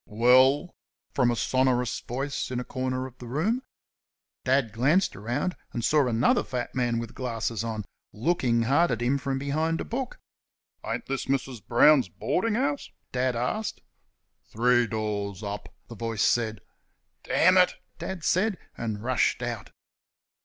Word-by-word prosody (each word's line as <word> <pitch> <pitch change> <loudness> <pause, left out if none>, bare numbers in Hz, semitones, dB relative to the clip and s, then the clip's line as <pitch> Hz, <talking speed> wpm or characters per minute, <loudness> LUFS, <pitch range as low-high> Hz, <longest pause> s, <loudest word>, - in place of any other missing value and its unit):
"Well?" 130 - +4 0.4
from 125 -3 +3
a 120 - +1
sonorous 130 -1 +1
voice 135 +3 -3
in 125 -1 -2
a - - -3
corner 130 0 -3
of 130 -1 -11
the 125 - -8
room. 180 - 0 0.8
Dad 130 -4 +2
glanced 145 +11 +2
round, 125 - -2 0.2
and 120 - -2
saw 150 -4 +3
another 115 0 +3
fat 125 -1 -4
man 120 -2 0
with 115 -1 -5
glasses 115 -3 -3
on, 110 -3 -4 0.3
looking 120 -2 +1
hard 145 +9 +3
at 115 - -1
him 135 +3 +2
from 135 0 -2
behind 155 +4 -1
a - - -3
book. 255 +2 -4 0.7
"Ain't - - -3
this 135 -1 -3
Mrs. 135 -4 -2
Brown's 130 -1 +5
boarding 210 - -1
house?" 280 +3 -1 0.2
Dad 125 0 0
asked. 125 - -2 0.6
"Three 120 +1 +2
doors 105 -2 -3
up," 100 0 -5 0.2
the - - -9
voice 115 -1 -2
said. 110 -4 +1 0.6
"Dammit!" 185 +1 +4 0.2
Dad 190 -4 -5
said, 195 +4 +2 0.2
and 110 -2 -4
rushed 125 0 +1
out. 120 -1 -4
125 Hz, 145 wpm, -27 LUFS, 115-145 Hz, 0.8 s, Brown's